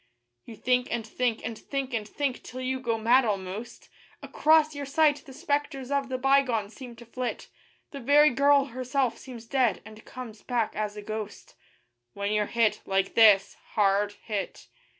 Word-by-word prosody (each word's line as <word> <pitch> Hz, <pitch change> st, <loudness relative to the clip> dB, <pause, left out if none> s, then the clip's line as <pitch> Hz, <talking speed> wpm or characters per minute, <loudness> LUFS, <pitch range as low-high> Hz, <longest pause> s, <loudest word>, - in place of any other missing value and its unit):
You 230 Hz, -, -10 dB
think 250 Hz, +3 st, +1 dB
and 235 Hz, -2 st, -3 dB
think, 230 Hz, 0 st, -2 dB
and 225 Hz, 0 st, -4 dB
think, 275 Hz, +3 st, -5 dB
and 215 Hz, -2 st, -2 dB
think, 270 Hz, +2 st, -3 dB
till 255 Hz, -, -9 dB
you 260 Hz, 0 st, -2 dB
go 235 Hz, -3 st, -1 dB
mad 240 Hz, +4 st, +4 dB
almost; 200 Hz, +1 st, -4 dB, 0.4 s
Across 310 Hz, 0 st, +3 dB
your 285 Hz, -1 st, -6 dB
sight 295 Hz, +1 st, +3 dB
the -, -, -10 dB
spectres 285 Hz, -1 st, -3 dB
of 280 Hz, -2 st, 0 dB
the 260 Hz, -, -2 dB
bygone 255 Hz, -5 st, +2 dB
seem 245 Hz, -1 st, -10 dB
to 235 Hz, +1 st, -13 dB
flit; 245 Hz, +1 st, -5 dB, 0.4 s
The 280 Hz, -, -7 dB
very 290 Hz, +4 st, +5 dB
girl 280 Hz, +1 st, +4 dB
herself 255 Hz, -1 st, -1 dB
seems 240 Hz, -3 st, -10 dB
dead, 240 Hz, -7 st, +1 dB
and 220 Hz, 0 st, -13 dB
comes 235 Hz, -4 st, -9 dB
back 235 Hz, -3 st, -1 dB
as 210 Hz, 0 st, -3 dB
a 210 Hz, -, -7 dB
ghost, 215 Hz, -1 st, -7 dB, 0.6 s
When 200 Hz, +1 st, -2 dB
you're 210 Hz, -1 st, +1 dB
hit, 230 Hz, -2 st, +1 dB
like 195 Hz, 0 st, 0 dB
this 210 Hz, -3 st, +6 dB, 0.2 s
hard 205 Hz, 0 st, +2 dB
hit. 205 Hz, -4 st, -5 dB
240 Hz, 170 wpm, -27 LUFS, 215-270 Hz, 0.6 s, this